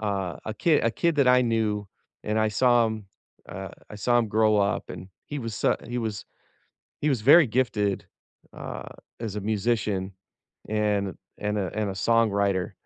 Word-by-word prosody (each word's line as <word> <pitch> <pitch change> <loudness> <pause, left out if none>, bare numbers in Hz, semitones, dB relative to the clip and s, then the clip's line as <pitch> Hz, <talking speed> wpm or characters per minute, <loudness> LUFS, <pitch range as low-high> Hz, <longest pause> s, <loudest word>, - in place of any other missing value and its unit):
uh, 100 -4 -2
a 110 - -4
ki 165 +4 +2
a 115 - +3
kid 165 +6 0
that 140 -2 +4
I 125 0 +6
knew, 110 -3 0 0.3
and 105 +1 -1
I 110 - +3
saw 120 +1 +4
him 110 -2 -5 0.4
uh, - - -6 0.2
I - - -8
saw 120 +4 +2
him 115 -3 0
grow 110 0 +3
up, 100 +1 0
and 90 +1 -8 0.2
he 145 -1 -5
was 115 -3 -5
su - - +2
he 120 +1 -2
was 110 -3 -3 0.8
he 150 - +2
was 130 -6 0
very 150 +8 +8
gifted, 110 -5 0 0.5
uh, - - -7 0.3
as 110 -3 -4
a 105 - -3
musician 105 -2 -1 0.6
and 105 -3 0 0.2
and 105 0 -2
a 95 - -1
and 105 -2 -1
a - - -3
songwriter, 100 -3 +1
110 Hz, 175 wpm, -26 LUFS, 100-120 Hz, 0.8 s, very